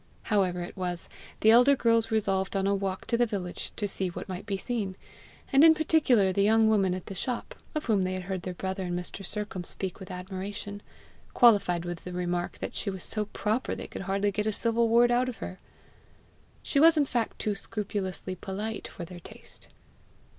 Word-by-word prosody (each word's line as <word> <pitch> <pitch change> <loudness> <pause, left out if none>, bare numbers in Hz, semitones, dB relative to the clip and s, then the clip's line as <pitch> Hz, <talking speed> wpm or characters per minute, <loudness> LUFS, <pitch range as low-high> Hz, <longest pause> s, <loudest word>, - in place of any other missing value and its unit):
However 185 -3 +2
it 175 - -8
was, 180 -3 -3 0.3
the 220 - +7
elder 250 +5 +7
girls 230 -2 +2
resolved 195 -3 0
on 195 0 +1
a 200 - +3
walk 195 -1 -2
to 235 - +1
the 240 0 +3
village, 190 -5 -4
to 205 - -1
see 190 -1 -1
what 175 - -6
might 185 +2 -6
be 200 -1 -1
seen, 205 -3 -3 0.6
and 275 +2 +7
in 320 0 +8
particular 265 - +3
the 200 - +2
young 220 +2 +5
woman 195 -4 +3
at 185 - -7
the - - -6
shop, 245 - -3 0.2
of 305 - -2
whom 210 -5 +2
they 185 0 -1
had 185 0 -4
heard 190 0 -3
their 180 0 -5
brother 190 +1 -3
and 175 0 -2
Mr. 180 +2 -7
Sercombe 200 -2 -5
speak 190 -2 -4
with 190 - -9
admiration, 195 +2 -6 0.5
qualified 200 -7 +5
with 175 -1 -5
the 180 - -7
remark 175 0 -2
that - - -5
she 205 - -2
was 190 -2 -5
so 215 -1 -2
proper 215 +4 -1
they - - -6
could - - -7
hardly 195 +2 0
get 210 +2 -1
a - - +2
civil 230 +2 +2
word 240 +1 +5
out 250 +1 +2
of 245 - -6
her. 185 - -7 1.0
She 280 - +1
was 325 +2 +7
in 295 - +4
fact 240 -4 -1
too 210 - -1
scrupulously 200 -3 -4
polite 200 +4 -5
for 175 - -8
their 175 +1 -10
taste. - - -13
200 Hz, 205 wpm, -28 LUFS, 185-225 Hz, 1.0 s, in